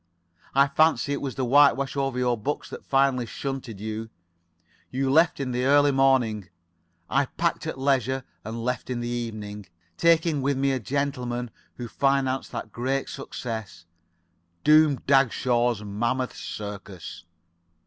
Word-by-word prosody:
I 140 +1 +6
fancy 145 -2 +2
it 140 - -3
was 135 -3 -4
the 130 - -1
whitewash 140 +1 +4
over 135 -2 -1
your 125 -1 +2
books 135 +7 -4
that - - -8
finally 135 -3 +2
shunted 135 -5 -5
you. 110 +1 -5 0.8
You 130 +1 -1
left 160 +3 +4
in 135 -2 -2
the 125 +1 -1
early 145 +1 +5
morning. 125 -8 +2 0.6
I 140 0 +1
packed 170 -1 -2
at 160 - -4
leisure 130 -1 +1 0.2
and 115 +1 -5
left 125 -1 -2
in 125 -1 -2
the 120 - -3
evening, 110 -4 -5 0.3
taking 165 -3 +3
with 140 0 0
me 135 0 +2
a 130 - 0
gentleman 125 -2 -2 0.2
who 120 - -6
financed 135 +1 0
that 110 - -6
great 130 +4 -2
success, 110 -10 -6 0.8
Doom 155 -1 +6
Dagshaw's 120 -4 +2
Mammoth 120 +5 -2
Circus. 100 -5 -7
130 Hz, 140 wpm, -25 LUFS, 115-140 Hz, 0.8 s, I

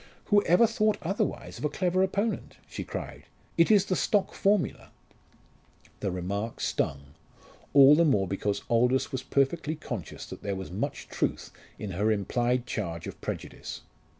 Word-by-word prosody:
"Who 205 - +7
ever 180 +7 +6
thought 215 -1 +1
otherwise 195 +5 -2
of - - -8
a - - +2
clever 180 +4 +1
opponent?" 200 +4 -1
she - - -5
cried. - - -7 0.3
"It 165 - +4
is 205 -3 +5
the 185 - 0
stock 205 +1 +1
formula." 200 -2 +1 1.1
The 100 - -1
remark 100 +5 -3
stung, 70 +1 -2 0.6
all 140 0 +8
the 165 +3 +5
more 105 - +3
because 100 +2 -2
Aldous 125 +3 +2
was 130 - -2
perfectly 140 +4 0
conscious 120 - -6
that - - -9
there 100 -1 -2
was 95 -2 -6
much 95 - -3
truth - - -2 0.3
in 105 -3 -5
her 105 +5 +1
implied 120 +4 0
charge 85 -8 -4
of - - -8
prejudice. - - -6
130 Hz, 155 wpm, -28 LUFS, -, 1.1 s, all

